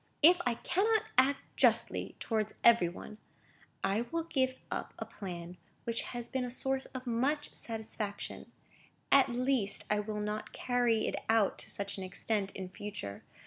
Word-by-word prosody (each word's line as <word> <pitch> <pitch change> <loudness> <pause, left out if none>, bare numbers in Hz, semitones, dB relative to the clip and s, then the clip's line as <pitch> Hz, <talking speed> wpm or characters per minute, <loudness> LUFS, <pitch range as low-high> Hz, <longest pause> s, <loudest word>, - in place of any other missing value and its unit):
"If 350 +3 +8
I 240 - +2
cannot 430 - +2
act 265 +2 +4
justly - - +3
towards 215 -2 -1
every 230 -7 +7
one, 210 +4 -9 0.6
I 200 +3 +2
will 335 0 0
give 260 -5 +1 0.2
up - - -3
a - - -4
plan 175 -2 -7 0.3
which 230 0 -1
has 240 -1 -5
been 260 -2 -1
a 250 - -3
source 265 +2 0
of 260 -1 -7
much 270 +6 0
satisfaction; 220 -2 -4 0.6
at 275 -1 +7
least, 245 -4 +1
I 210 - +3
will 210 0 -3
not 210 +1 -3
carry 245 -3 +2
it - - -1
out 220 -3 +3
to - - -6
such 200 0 -2
an - - -4
extent 195 +2 -1
in 190 -1 -4
future. 185 - -6
230 Hz, 160 wpm, -32 LUFS, 205-260 Hz, 0.6 s, If